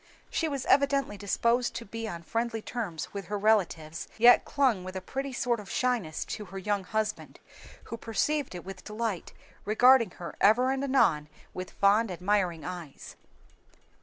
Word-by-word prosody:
She 325 - 0
was 280 -4 -3
evidently 275 -4 +2
disposed 235 +4 0
to 235 - -5
be 225 +2 -5
on 170 -4 -6
friendly 230 +4 -2
terms 205 -10 -5
with 200 -2 -5
her 205 +2 -3
new 200 - -9
relatives, 170 -7 +1
yet 240 +2 +7
clung 255 -10 +1
with 185 +1 -8
a - - -2
pretty 270 +8 -5
sort 245 -2 0
of 200 -2 -10
shyness 235 -11 -1
to 210 - -6
her 195 +1 -9
young 200 0 -1
husband, 215 +1 -3 0.4
who 230 - -7
perceived 250 +3 -1
it 175 - -8
with 190 -1 -9
delight, 215 -4 -4 0.3
regarding 235 +1 +5
her 170 - -7
ever 245 +6 +5
and 270 0 -1
anon 165 - +2 0.2
with 185 0 -6
fond, 205 +3 +3
admiring 180 -3 0
eyes. 175 -6 -8
215 Hz, 165 wpm, -29 LUFS, 185-245 Hz, 0.4 s, yet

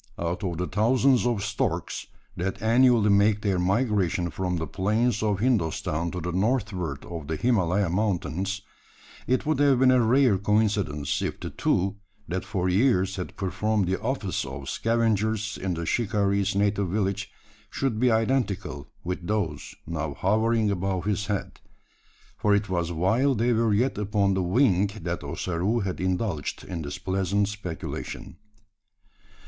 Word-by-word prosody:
Out 85 +4 -3
of 90 -4 -2
the 90 - -1
thousands 125 +4 +3
of 115 -5 0
storks, 105 +1 -2 0.3
that 95 +3 -3
annually 115 -1 +4
make 105 +1 +3
their 95 -3 +1
migration 95 -3 +1
from 90 0 -2
the 80 - -2
plains 105 - 0
of 105 -2 +1
Hindostan 85 -7 0
to 90 - -4
the 90 +1 -3
northward 95 - -1
of 80 -4 -7
the 80 - -2
Himalaya 100 -2 +2
Mountains, 95 +1 -1 0.6
it 130 +4 +1
would 155 -2 +1
have 140 -2 +5
been 130 0 +5
a 130 -1 +4
rare 120 -3 +4
coincidence 100 -9 0
if - - -3
the - - -6
two 95 +3 0 0.3
that 95 +2 -2
for 95 -4 -2
years 95 -1 +2
had 90 - -6
performed 100 +2 0
the 95 +1 -1
office 115 -7 -2
of 65 0 -7
scavengers 110 -1 0
in 95 -2 -2
the 85 0 -4
shikaree's 100 -2 +1
native 100 -1 +1
village, 100 0 -1 0.4
should 130 -5 -1
be 125 +1 +4
identical 110 - 0 0.2
with 90 -1 -4
those 85 -9 -2
now 80 -3 -3
hovering 110 +3 +2
above 95 -1 -2
his 105 0 -1
head 105 -3 -3 0.8
for 105 -1 +3
it 100 -1 -1
was 85 -2 -1
while 110 - +2
they 120 +2 +2
were 115 -1 +2
yet 110 +2 +1
upon 100 -1 +1
the 95 - 0
wing 95 0 +3 0.2
that 85 -1 -3
Ossaroo 95 +7 -1
had 95 -2 -3
indulged 95 -4 -2
in 85 -3 -5
this 70 -2 -5
pleasant 95 +2 0
speculation. 95 -6 -6
100 Hz, 155 wpm, -26 LUFS, 90-110 Hz, 0.8 s, have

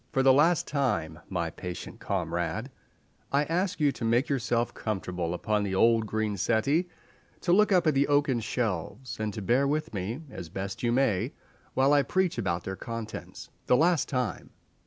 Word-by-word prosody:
For 135 - +2
the 135 0 +7
last 160 +5 +4
time, 125 - -1
my 85 -3 -2
patient 90 +3 -7
comrade, 85 - -2 0.6
I 140 +1 +3
ask 180 +4 -1
you 145 -2 +4
to 125 - -8
make 120 +4 +2
yourself 120 -3 0
comfortable 90 -5 -3
upon 105 +3 0
the 100 -2 -1
old 115 +2 +4
green 110 -1 -1
settee, 140 - +2 0.5
to 175 - +2
look 210 +2 +5
up 180 -2 +4
at 155 - +4
the 140 +1 +2
oaken 145 -3 +2
shelves, 115 +1 -3
and 110 -1 -1
to 105 - -5
bear 125 +8 +3
with 155 -1 -1
me 110 - -4
as 90 -3 -7
best 95 +3 -5
you 120 - +1
may 120 -7 +1 0.4
while 135 +2 +4
I 145 - +6
preach 185 -2 0
about 85 -5 -1
their 95 +1 -4
contents. 115 +1 -7 0.2
The 125 - +5
last 170 -1 +3
time! 125 -8 -2
115 Hz, 180 wpm, -28 LUFS, 95-140 Hz, 0.6 s, the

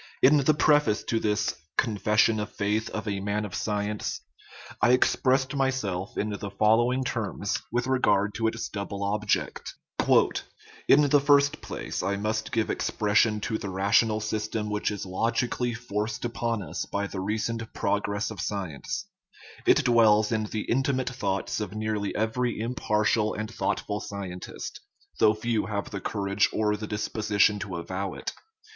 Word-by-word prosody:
In 145 +3 +7
the 145 +2 +3
preface 150 -8 +3
to 115 - 0
this 105 0 0 0.2
Confession 110 0 +2
of 105 - -4
Faith 105 +2 -1
of 110 0 -5
a 100 -1 -1
Man 105 +2 -1
of 100 - -8
Science 105 0 -2 0.6
I 120 - +5
expressed 130 +1 +2
myself 130 -9 -1
in 105 - 0
the 100 0 -4
following 115 +6 +3
words 100 -2 -2
with 120 +1 0
regard 105 -6 +2
to 115 -1 0
its 115 +1 -2
double 100 0 -5
object: 105 0 -1
" - - 0
In 150 - +8
the 145 0 +4
first 145 0 +4
place, - - -4
I 100 +2 0
must 110 +2 -2
give 115 -1 0
expression 105 +1 +2
to 110 +1 -2
the 100 - -5
rational 105 +3 +2
system 110 0 -2
which 105 0 0
is 100 -2 -4
logi 115 +6 0
cally 120 0 -2
forced 110 -1 -3
upon 115 -2 -2
us 80 -1 -4
by 100 0 -2
the 100 -1 -5
recent 110 +3 -2
progress 100 +1 -1
of 105 - -6
science; 95 -9 -4 0.6
it - - +5
dwells 110 -3 +5
in 110 -1 0
the 105 0 -3
intimate 130 +1 0
thoughts 100 -6 -2
of 105 -1 -4
nearly 110 -1 -2
every 110 +2 0
im 115 +3 -2
partial 105 -1 +1
and 110 +2 -5
thoughtful 105 -1 -1
scientist, 95 -4 -6 0.4
though 110 - +5
few 110 -1 -1
have 100 -2 -3
the 100 -2 -4
courage 100 0 +1
or 105 -1 +1
the 105 0 -6
disposition 105 0 +1
to 100 -2 -5
avow 95 +3 -4
it. - - -5
105 Hz, 160 wpm, -27 LUFS, 100-115 Hz, 0.6 s, In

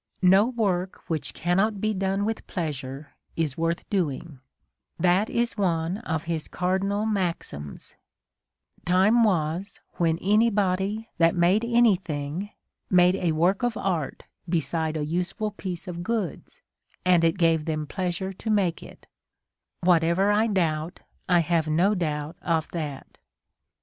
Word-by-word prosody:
No 190 +4 +6
work 195 -7 -1
which 155 -2 -1
cannot 195 +5 0
be 215 +2 0
done 195 +1 0
with 225 +1 -3
pleasure 140 -4 -5 0.2
is 155 -5 -1
worth 165 +1 -2
doing: 165 -6 -2 0.3
" 65 +1 -51
that 190 +5 +3
is 235 0 -1
one 170 0 0
of 160 -9 -3
his 165 -2 -3
cardinal 195 +3 -1
maxims: 175 - -3 0.9
Time 190 +6 +4
was 175 -2 0 0.2
when 165 -2 +2
any 210 +6 +3
body 200 +2 -1
that 165 +2 +4
made 180 +5 +3
anything, 190 -8 +1 0.4
made 180 0 +5
a 175 -4 0
work 175 +5 +2
of 245 -2 0
art 170 -7 -2 0.3
beside 160 -1 -1
a 150 - -2
useful 180 +6 -2
piece 185 -2 -6
of 175 -1 -5
goods, 230 - -4 0.4
and 180 -2 +4
it 165 +2 +2
gave 165 -3 +2
them 155 -2 -2
pleasure 185 +3 -3
to 220 - -6
make 195 -6 +1
it: - - -13 0.8
whatever 175 +3 +3
I 215 +2 +3
doubt, 170 -4 -1 0.3
I 175 -2 +5
have 165 -1 +1
no 175 +7 +3
doubt 155 -3 -3
of 160 -2 0
that." 150 -5 -6
180 Hz, 140 wpm, -26 LUFS, 160-200 Hz, 0.9 s, No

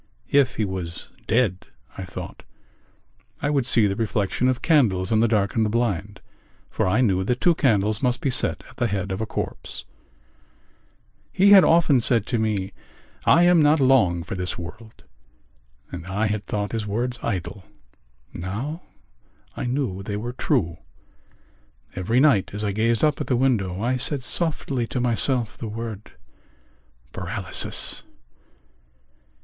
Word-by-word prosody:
If 135 -3 +3
he 110 - 0
was 90 -3 -6 0.2
dead, 105 -5 0 0.3
I - - -6
thought, - - -9 1.0
I 145 - -1
would 140 -4 0
see 115 -3 +5
the 100 -1 0
reflection 110 +2 -1
of 130 -1 -1
candles 110 - +2
on 110 - +3
the 115 - +3
darkened 110 0 +1
blind 105 -4 -2 0.5
for - - -1
I 105 +7 +2
knew 95 -6 +2
that 125 +6 -1
two 175 - +4
candles 110 -8 +1
must 125 -2 0
be 135 - -1
set 130 - -2
at - - -18
the 120 - +1
head 100 -2 -3
of 95 +3 -3
a 110 - -3
corpse. - - -6 1.5
He 200 +2 +4
had 195 -2 +9
often 160 -6 +4
said 115 -2 +1
to 120 -2 -1
me: 100 -3 -2 0.5
"I 170 - +5
am 175 -2 +5
not 150 +1 +4
long 115 -11 +3
for 110 - -7
this 90 -1 -3
world," 100 +6 -10 0.9
and 90 0 -8
I 100 +4 -1
had 105 -2 -3
thought 105 -1 -3
his 110 -2 -3
words 120 +4 -2
idle. 95 +1 -4 0.7
Now 115 - -5 0.7
I - - -4
knew 120 -7 -2
they 100 +1 -4
were 120 +4 -5
true. 85 -8 -1 1.2
Every 110 +7 0
night 130 -9 +3
as 105 - -4
I 105 - 0
gazed 115 +3 0
up 150 -2 +2
at - - -4
the 130 - +1
window 110 -7 0
I 125 +2 0
said 135 +1 -1
softly 140 -6 -2
to 125 - -3
myself 120 -1 0
the 115 - -5
word 110 -1 -7 1.0
paralysis. 95 +1 +3
110 Hz, 155 wpm, -23 LUFS, 100-130 Hz, 1.5 s, had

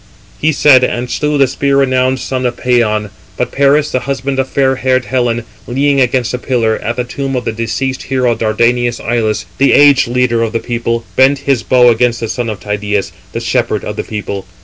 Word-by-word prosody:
He 155 - +2
said, 140 -3 +5
and 125 0 -2
slew 150 0 0
the 140 - +5
spear 140 +1 0
renowned 130 -1 +1
son 130 0 -2
of 120 - -4
Pæon. 110 -5 0 0.3
But 125 - -2
Paris, 140 +2 +2
the 130 - 0
husband 135 0 -2
of 135 - -1
fair 135 -1 +1
haired 130 -1 +1
Helen, 120 -2 -1 0.2
leaning 140 +2 +1
against 125 -1 0
a 125 - -2
pillar, 115 -4 0
at 120 +3 -3
the 125 - -1
tomb 135 +2 -4
of 125 - -3
the - - -1
deceased 120 +4 -3
hero, 130 -3 +1
Dardanian 120 +2 +1
Ilus, 115 -2 -1
the 140 - +4
aged 145 -3 +5
leader 120 -1 +1
of 115 -1 -1
the 115 - 0
people, 115 -1 -3
bent 135 +2 +4
his 135 -4 +2
bow 125 +1 +4
against 120 +1 +1
the 115 - -3
son 120 -2 -3
of 105 -3 -5
Tydeus, 105 -1 -2 0.2
the - - -4
shepherd - - -1
of - - -5
the - - -3
people. 100 -3 -6
125 Hz, 205 wpm, -13 LUFS, 115-135 Hz, 0.3 s, said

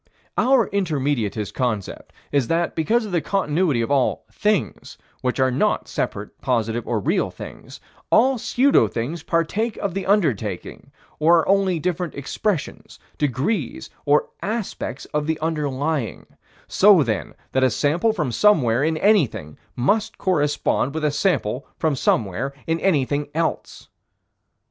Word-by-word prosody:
Our 255 -4 +3
Intermediatist 140 - -1
concept 115 -7 -3 0.2
is 140 -4 +1
that, 170 +1 0
because 220 +9 +1
of 210 - -7
the 175 -2 +1
continuity 160 -8 +1
of 115 - -3
all 135 -3 +1
"things," 210 -2 -1 0.2
which 125 0 -1
are 130 0 +3
not 125 - 0
separate, - - -4
positive, 120 -2 -1
or 115 -3 0
real - - 0
things, - - -10 0.3
all 255 +3 +4
pseudo 250 - +3
things 120 +10 -4
partake 185 +9 -1
of 200 -3 -3
the 195 0 -4
underlying, 130 - -1 0.3
or 165 +2 +5
are - - -6
only 195 -2 +3
different 175 0 -2
expressions, 150 +5 -3 0.2
degrees, 145 - -1
or 145 +1 +2
aspects 210 - -4
of 150 0 -1
the 160 -1 0
underlying: 150 -4 -2 0.4
so - - +6
then - - -3 0.2
that 130 - +1
a 130 - +5
sample 155 - +1
from 155 - -2
somewhere 130 - +3
in 160 +1 +1
anything 155 - +2 0.2
must 210 - 0
correspond 145 -4 0
with 160 -1 -1
a 150 - +2
sample 140 - 0
from 155 -3 +1
somewhere 120 +2 0
in 165 0 0
anything 145 -5 +1
else. 165 0 -2
150 Hz, 140 wpm, -22 LUFS, 130-190 Hz, 0.4 s, so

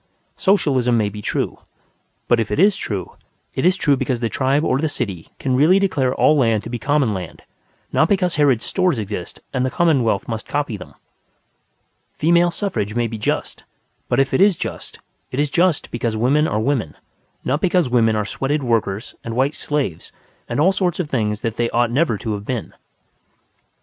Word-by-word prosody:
Socialism 135 - +2
may 105 -2 +1
be 105 +1 -8
true. - - -2 0.7
But 120 - +3
if 110 - -1
it - - -1
is 200 +2 +5
true, 100 - -5 0.4
it 130 - +1
is 185 +1 +3
true 145 -2 +3
because 130 -2 -1
the 115 -1 -1
tribe 140 +4 +1
or 130 -4 +1
the 160 +1 0
city 100 - -4
can 130 -2 -1
really 155 +8 +5
declare 145 -10 +1
all 155 - +4
land 115 -6 +2
to 115 - -7
be 120 - -3
common 140 -5 +1
land, 90 -4 -7 0.5
not 160 - +3
because 185 -3 +2
Harrod's 140 -6 +2
Stores 185 -7 +1
exist 100 -4 -5
and 130 -2 0
the 130 - +1
commonwealth 130 -11 +1
must 110 -1 -4
copy 145 -6 -2
them. 95 - -11 1.2
Female 170 +2 +3
suffrage 170 - -3
may 120 0 +1
be 115 -1 -5
just. - - -2 0.5
But 120 - +2
if 135 0 +1
it - - +3
is 200 -2 +5
just, - - -6 0.3
it 130 - -4
is 145 -1 +1
just 175 -2 +1
because 115 -2 -2
women 140 +7 +3
are 105 - -1
women, 115 - -1 0.5
not 145 +5 0
because 180 -4 +2
women 115 -3 +3
are 105 -1 0
sweated 140 +6 -2
workers 110 -3 -1
and 115 -1 -5
white 135 +4 +1
slaves 145 - -3 0.4
and - - -2
all 175 +6 +5
sorts 185 -3 -1
of 160 -5 -3
things 105 -4 -1
that 115 -1 -3
they 120 0 +1
ought 120 0 +1
never 135 -3 +1
to 110 +1 -3
have 100 -1 -5
been. 120 -3 -4
130 Hz, 190 wpm, -20 LUFS, 115-150 Hz, 1.2 s, is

